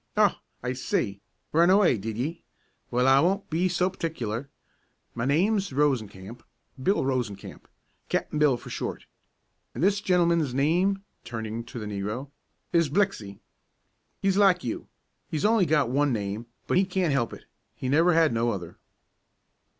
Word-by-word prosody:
"Oh, - - +4 0.3
I 125 0 -1
see! 100 -5 -2 0.3
Run 170 +3 +5
away, 185 - +4
did 110 +2 -5
ye? 150 +8 -3 0.5
Well, 125 +2 +2
I 135 +1 +6
won't 190 +5 +1
be 175 +4 +1
so 180 +1 +1
partic'ler. 140 - -4 0.6
My 115 - -2
name's 195 +7 +2
Rosencamp, 120 -6 -1 0.4
Bill 195 +5 +2
Rosencamp. 125 -7 -3 0.4
Cap'n 150 - -1
Bill, 145 -5 +4
for - - -11
short. - - -4 0.7
An' 120 - -4
this 200 +3 +3
gentleman's 170 -8 +2
name," 180 +8 +2 0.2
turning 115 0 -5
to 120 - -9
the 110 - -5
negro, 105 +7 -4 0.4
"is 170 -3 +3
Blixey. 140 - -1 0.8
He's 195 0 +2
like 195 -5 +4
you; 120 - -4 0.4
he's 155 +2 -2
only 215 -4 +4
got 145 -5 +2
one 145 +1 +2
name; 105 0 -3 0.2
but - - +1
he 190 - +5
can't 185 -5 0
help 120 -4 0
it, - - -11 0.3
he 130 - -5
never 165 +6 +4
had 160 -6 +4
no 115 +1 +1
other." 90 -6 -5
140 Hz, 150 wpm, -27 LUFS, 115-180 Hz, 0.8 s, I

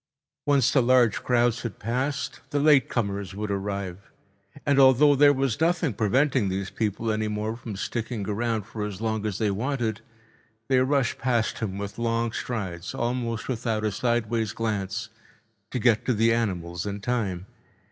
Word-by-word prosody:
Once 140 -4 +4
the 135 - +4
large 120 -3 +4
crowds 120 -1 +2
had 115 -3 -5
passed, 130 +6 -2
the 145 0 0
late 140 -3 +5
comers 100 -5 -2
would 105 0 -3
arrive, 100 -1 -4 0.6
and 140 -2 +3
although 135 +2 +7
there 145 +1 +6
was 135 -2 -1
nothing 165 -4 +2
preventing 115 0 +2
these 95 0 -3
people 110 +1 -1
any 110 0 -1
more 105 +1 -2
from 115 -3 -7
sticking 110 +1 -3
around 110 +1 -1
for 105 +2 -6
as 105 -2 -5
long 110 -1 -1
as 100 -2 -3
they 105 -2 +1
wanted, 115 0 -2 0.7
they 130 -1 +4
rushed 130 -1 +1
past 120 -3 0
with 100 0 -4
long 115 0 0
strides, 95 -8 -4
almost 120 -2 -2
without 115 -3 -1
a 105 - +1
sideways 115 -2 0
glance, 110 0 -2 0.6
to - - -3
get 115 -2 +3
to 125 - +1
the 115 +2 +3
animals 90 -6 -2
in 100 0 -4
time. 100 -6 -2
115 Hz, 160 wpm, -26 LUFS, 105-125 Hz, 0.7 s, although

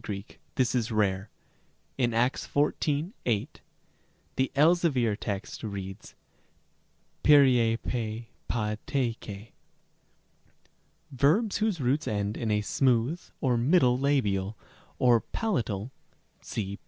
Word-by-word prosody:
Greek 100 0 -7 0.2
this 125 -2 +1
is 120 -2 0
rare. 100 -2 0 0.7
In 120 -3 +1
Acts 120 +4 0
xiv. 150 +3 0 0.2
8, 110 -4 -1 0.7
the 130 0 0
Elzevir 145 -8 +3
text 100 -1 -5
reads 100 -1 -7 1.1
περίεπε 120 -5 +3 0.2
WAT 105 -2 -1
KEL 140 - 0
Rem. 115 -3 0
c. 105 +2 -9 1.6
Verbs 155 - +2
whose 215 -5 0
roots 135 +3 0
end 105 -2 -1
in 115 - -3
a 105 0 +2
smooth 130 +7 +1 0.2
or 125 -4 +2
middle 125 0 +4
labial 110 -8 0 0.4
or 120 -2 +5
pala 210 - -1
tal 105 +2 -5 0.5
(see 100 -1 -4
p. - - -41
120 Hz, 115 wpm, -28 LUFS, 105-140 Hz, 1.6 s, or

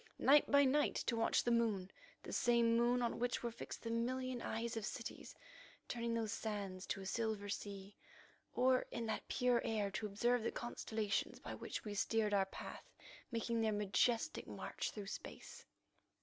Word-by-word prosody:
Night 290 +2 +6
by 285 0 +7
night 290 +3 +3
to 235 - 0
watch 225 0 +3
the 240 - +1
moon, 220 -6 +1 0.3
the - - -6
same 235 -1 +4
moon 240 +1 +3
on 235 - -1
which 245 +1 0
were 235 - -1
fixed 230 - -7
the 230 - -2
million 250 +1 -1
eyes 230 +1 -2
of 225 - -2
cities, - - -6 0.5
turning 235 -1 -1
those 225 -2 -1
sands 200 -4 -4
to 195 - -2
a - - -7
silver 215 0 -1
sea, 200 -1 -5 0.6
or, 255 0 +4
in 235 - -3
that 220 - -3
pure 250 -1 +2
air, 210 -3 0
to 205 +2 -2
observe 240 +4 +2
the 225 - -1
constellations 220 -3 -2
by - - -6
which - - -5
we 210 - -3
steered 210 +1 +1
our 195 -1 +3
path - - -8 0.4
making 230 0 0
their 220 -1 +2
majestic 215 +6 +1
march - - -4
through 205 -2 -6
space. 195 - -8
230 Hz, 175 wpm, -38 LUFS, 210-240 Hz, 0.6 s, by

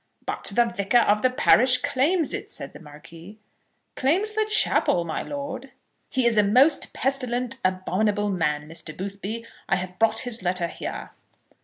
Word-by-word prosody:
"But - - -5
the 240 - +4
Vicar 200 +2 0
of 210 -1 +2
the 255 - +3
parish 255 0 +4
claims 285 +4 +1
it," - - -6
said - - -6
the - - -12
Marquis. 165 +5 -14 0.6
"Claims 360 +11 +1
the 430 0 -1
chapel, 180 - +3
my 160 - -4
lord!" 285 -1 -7 0.4
"He 260 -2 0
is 235 -2 +3
a 210 - +5
most 260 +9 +3
pestilent, 255 -1 -1
abominable 200 +3 -1
man, 150 -5 -2
Mr. 160 -1 -8
Boothby. 200 +4 -6 0.2
I - - +3
have 180 -1 -6
brought 225 0 +4
his 245 -4 -1
letter 180 -1 -1
here." 170 - -7
215 Hz, 160 wpm, -24 LUFS, 185-260 Hz, 0.6 s, a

